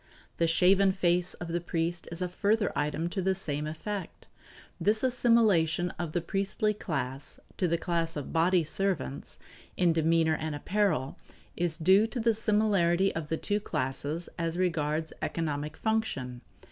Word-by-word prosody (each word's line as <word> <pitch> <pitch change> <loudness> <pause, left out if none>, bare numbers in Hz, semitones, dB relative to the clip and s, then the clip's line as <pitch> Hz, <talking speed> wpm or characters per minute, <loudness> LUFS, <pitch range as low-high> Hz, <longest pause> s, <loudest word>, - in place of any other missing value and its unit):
The 165 - +2
shaven 190 +4 +4
face 180 -1 +1
of 175 - -7
the 170 +1 -1
priest 170 0 -2
is 170 +2 -3
a - - 0
further 205 +4 +1
item 150 +3 -1
to 190 +2 -2
the 190 +1 +1
same 150 -5 -3
effect. 185 +6 -6 0.5
This 215 +3 +2
assimilation 215 -9 +3
of 170 -3 -3
the 175 - 0
priestly 195 +4 0
class 140 -8 -4 0.2
to 180 - +1
the 170 0 +1
class 165 -1 -1
of 145 -3 -5
body 175 +1 +3
servants, 155 -4 -1 0.4
in 175 -2 +3
demeanor 160 0 +3
and 155 -1 -3
apparel, 165 -5 0 0.4
is 170 -2 -1
due 190 +6 +5
to 245 - -5
the 230 0 +3
similarity 200 -4 +2
of 160 -2 -4
the 160 - -1
two 205 +4 -1
classes 150 -1 -3
as 165 0 -1
regards 160 -3 0
economic 150 -2 -3
function. 135 - -2
170 Hz, 155 wpm, -29 LUFS, 160-195 Hz, 0.5 s, due